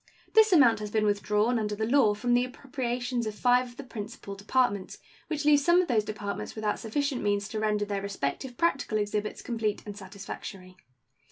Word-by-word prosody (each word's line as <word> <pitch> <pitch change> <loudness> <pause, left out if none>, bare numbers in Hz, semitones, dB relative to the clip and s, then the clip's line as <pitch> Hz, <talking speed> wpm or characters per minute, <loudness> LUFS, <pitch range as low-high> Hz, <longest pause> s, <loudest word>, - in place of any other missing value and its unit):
This 440 -1 +6
amount 250 - +6
has 210 0 -5
been 215 0 +1
withdrawn, 210 +3 +1
under 210 -1 -2
the 220 +1 -1
law, 235 -4 +4
from 240 +3 0
the 245 0 +4
appropriations 250 -2 -3
of 215 - -4
five 250 +2 +3
of 240 0 -15
the 280 - -6
principal 215 -4 -7
Departments, 200 -1 0 0.3
which 300 -2 -3
leaves 290 -1 +5
some 345 +3 +5
of 365 - +2
those 225 -4 +2
Departments 205 -1 -5
without 215 -1 -1
sufficient 275 +3 -1
means 205 -1 0
to 220 - -3
render 210 -1 +1
their 200 -1 -2
respective 200 - -4
practical 275 -9 +1
exhibits 210 0 -2
complete 225 -3 -2
and 205 -1 -7
satisfactory. 195 -1 -9
220 Hz, 185 wpm, -28 LUFS, 205-250 Hz, 0.3 s, This